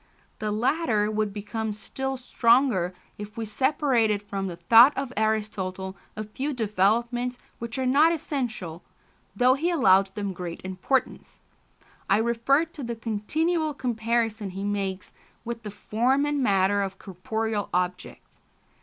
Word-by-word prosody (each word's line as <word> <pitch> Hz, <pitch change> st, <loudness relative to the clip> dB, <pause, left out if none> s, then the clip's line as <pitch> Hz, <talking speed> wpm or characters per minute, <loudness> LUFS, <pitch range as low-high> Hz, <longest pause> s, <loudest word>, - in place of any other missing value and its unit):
The 215 Hz, -1 st, -2 dB
latter 220 Hz, -2 st, +1 dB
would 215 Hz, -1 st, 0 dB
become 215 Hz, +2 st, -4 dB
still 265 Hz, +6 st, -4 dB
stronger 235 Hz, -6 st, +3 dB, 0.3 s
if 210 Hz, +1 st, -8 dB
we 225 Hz, -, -2 dB
separated 230 Hz, -3 st, +1 dB
from 195 Hz, -1 st, -4 dB
the 175 Hz, -, -5 dB
thought 230 Hz, +10 st, +6 dB
of 270 Hz, -2 st, -3 dB
Aristotle 200 Hz, -3 st, -2 dB, 0.2 s
a 215 Hz, -, -4 dB
few 265 Hz, +8 st, -4 dB
developments 235 Hz, +3 st, 0 dB, 0.2 s
which 235 Hz, +2 st, -5 dB
are 260 Hz, -, -1 dB
not 290 Hz, +6 st, +5 dB
essential, 235 Hz, -, -3 dB, 0.5 s
though 250 Hz, +5 st, +5 dB
he 310 Hz, +6 st, 0 dB
allowed 195 Hz, -, +4 dB
them 200 Hz, -2 st, -3 dB
great 175 Hz, 0 st, -7 dB
importance: 190 Hz, +8 st, -2 dB, 0.7 s
I 195 Hz, -, +5 dB
refer 235 Hz, +7 st, +2 dB
to 320 Hz, -2 st, -11 dB
the 235 Hz, -2 st, -4 dB
continual 305 Hz, +9 st, -1 dB
comparison 225 Hz, -3 st, -1 dB
he 190 Hz, +2 st, -6 dB
makes 195 Hz, -2 st, -3 dB, 0.3 s
with 235 Hz, 0 st, -4 dB
the 215 Hz, -, -6 dB
form 245 Hz, +7 st, +1 dB
and 290 Hz, -1 st, 0 dB
matter 200 Hz, -3 st, +3 dB
of 195 Hz, -1 st, -3 dB
corporeal 215 Hz, +3 st, -3 dB
objects. 180 Hz, 0 st, -3 dB
220 Hz, 135 wpm, -26 LUFS, 200-255 Hz, 0.7 s, thought